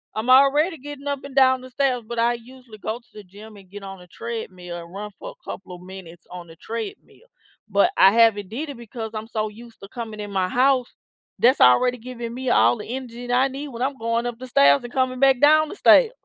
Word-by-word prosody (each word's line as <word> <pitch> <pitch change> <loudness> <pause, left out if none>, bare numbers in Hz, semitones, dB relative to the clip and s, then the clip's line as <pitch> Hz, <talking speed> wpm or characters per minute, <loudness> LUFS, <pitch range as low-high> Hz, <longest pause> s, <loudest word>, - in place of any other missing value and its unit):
I'm 220 +4 -3
already 290 +6 +5
getting 285 0 -9
up 280 -1 -2
and 275 -1 -11
down 260 -1 +5
the 255 - -12
stairs, 255 -2 0
but 235 0 -6
I 235 +1 +2
usually 240 -1 -14
go 220 +3 -4
to 245 - -31
the 210 - -11
gym 205 +3 -14
and 190 -2 -17
get 205 +1 -10
on 195 -1 -9
a 180 - -15
treadmill, 185 -5 -7
and 170 +1 -11
run 210 +1 -7
for - - -8
a - - -23
couple 185 -2 -8
of 180 - -14
minutes 180 -2 -12
on 180 -1 -9
the 165 - -14
treadmill, 230 - -8 0.4
but 200 0 +3
I 195 - +7
haven't 225 -3 +3
did 270 +10 -5
it 280 - -8
because 225 -1 -7
I'm 215 0 -6
so 215 -2 -2
used 230 +1 -15
to 195 - -11
coming 225 -3 -7
in 205 -1 -7
my 190 -2 0
house. 255 +2 +2 0.5
That's 255 +3 +4
already 245 - +5
giving 235 -1 -7
me 255 +1 -4
all 240 - +4
the 210 - -8
energy 245 -1 -7
that 245 - -1
I 255 +2 +3
need 275 +2 -7
when 240 -2 -8
I'm 270 +1 -1
going 230 0 -1
up 240 -1 -5
the 255 - -8
stairs 140 - +4
and 240 - -8
coming 255 -1 -1
back 270 -1 +4
down 310 +2 +5
the - - -8
stairs. 465 +2 +5
235 Hz, 245 wpm, -22 LUFS, 205-260 Hz, 0.5 s, I